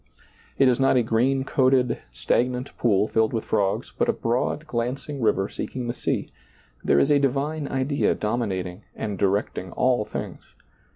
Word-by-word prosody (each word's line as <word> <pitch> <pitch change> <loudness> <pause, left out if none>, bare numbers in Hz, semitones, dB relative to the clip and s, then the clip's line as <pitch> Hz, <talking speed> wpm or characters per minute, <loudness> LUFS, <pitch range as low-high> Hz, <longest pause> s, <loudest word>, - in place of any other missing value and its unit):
It 135 - +5
is 125 0 +3
not 135 -1 +4
a 125 - +3
green 125 +4 +1
coated, 130 -2 +2
stagnant 125 +2 -1
pool 105 -3 +2
filled 110 +1 +1
with 115 - -2
frogs, 100 -3 0
but - - +1
a - - +3
broad 125 +6 -1
glancing 130 +2 -3
river 105 -3 +2
seeking 125 +3 -5
the 120 - -2
sea; - - -2 0.5
there - - +3
is 140 - +4
a 145 - +5
divine 140 +2 -1
idea 135 +2 0
dominating 100 -5 -2
and 105 -4 -4
direct 100 +1 +1
ing 90 -1 -9
all 125 -3 +2
things. - - -6
120 Hz, 165 wpm, -24 LUFS, 105-135 Hz, 0.5 s, It